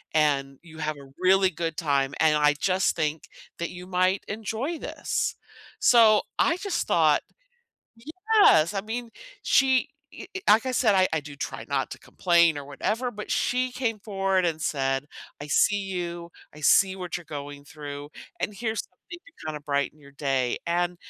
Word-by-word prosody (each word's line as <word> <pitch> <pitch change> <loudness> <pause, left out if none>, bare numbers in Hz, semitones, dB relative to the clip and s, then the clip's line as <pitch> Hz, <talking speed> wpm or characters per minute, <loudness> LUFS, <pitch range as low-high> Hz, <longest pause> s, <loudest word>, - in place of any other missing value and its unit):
and 140 -3 +1
you 160 -2 -13
have 155 -1 -2
a 135 -1 -14
really 190 +1 +4
good 165 -1 -4
time, 140 -4 0
and 155 -1 +4
I 150 0 +4
just 190 0 +1
think 155 -1 -2 0.3
that 170 - -2
you 180 0 -9
might 185 +1 +1
enjoy 225 +9 -3
this," - - -2 0.4
so 225 -3 +6 0.2
I 330 +4 +3
just 395 -1 -2
thought - - +4 1.3
Yes, 160 +3 +5
I 195 - 0
mean, 230 +3 -5 0.3
she 265 -1 +3 0.2
e - - -9
e 380 - -4
like 220 +4 +6
I 260 - 0
said, 225 -4 +3
I 185 -1 +4
I 160 - +2
do 145 0 -10
try - - -5
not - - -1
to - - -9
complain 170 -3 +2
or 140 - -7
whatever, 220 - -2
but 210 -2 -8
she 255 0 0
came 230 -4 -2
forward 195 -3 0
and 160 -1 -2
said, 135 0 -1 0.3
"I 145 - -7
see 205 - +3
you, 175 -3 -5 0.2
I 150 - -12
see 190 +5 +5
what 180 -2 -4
you're 175 - -10
going 145 -1 -7
through, 145 -1 -8 0.3
and 210 - -2
here's 220 +1 -2
something 345 +8 -13
to - - -16
kinda 150 -1 -4
brighten 140 +1 -2
your 140 -1 -16
day," 135 -3 -1
and 175 +1 0
175 Hz, 175 wpm, -26 LUFS, 150-210 Hz, 1.3 s, so